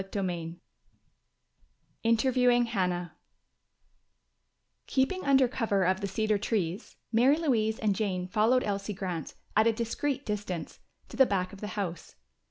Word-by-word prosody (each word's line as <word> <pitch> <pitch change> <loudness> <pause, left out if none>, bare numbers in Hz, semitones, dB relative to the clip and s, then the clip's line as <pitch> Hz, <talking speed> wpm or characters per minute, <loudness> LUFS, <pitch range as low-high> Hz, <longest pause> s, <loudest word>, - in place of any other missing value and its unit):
CHAPTER 195 0 -3
IV 170 -2 -4 1.5
Interviewing 245 +1 +3
Hannah 180 -6 -2 1.7
Keeping 275 +8 0
under 270 -2 +4
cover 220 -6 0
of 185 +2 +1
the 200 - -1
cedar 215 +1 0
trees, 195 -2 -2 0.2
Mary 250 +6 +4
Louise 225 -9 +1
and 210 -3 +1
Jane 185 -4 -2
followed 220 +6 +3
Elsie 200 0 -3
Grant, 180 -5 -4 0.2
at 220 +1 +5
a - - +5
discreet 245 +5 -2
distance, 200 -6 -4 0.3
to - - -9
the 265 - +6
back 185 -1 -1
of 195 - -11
the 210 - -4
house. 175 -5 -4
210 Hz, 135 wpm, -29 LUFS, 185-240 Hz, 1.7 s, the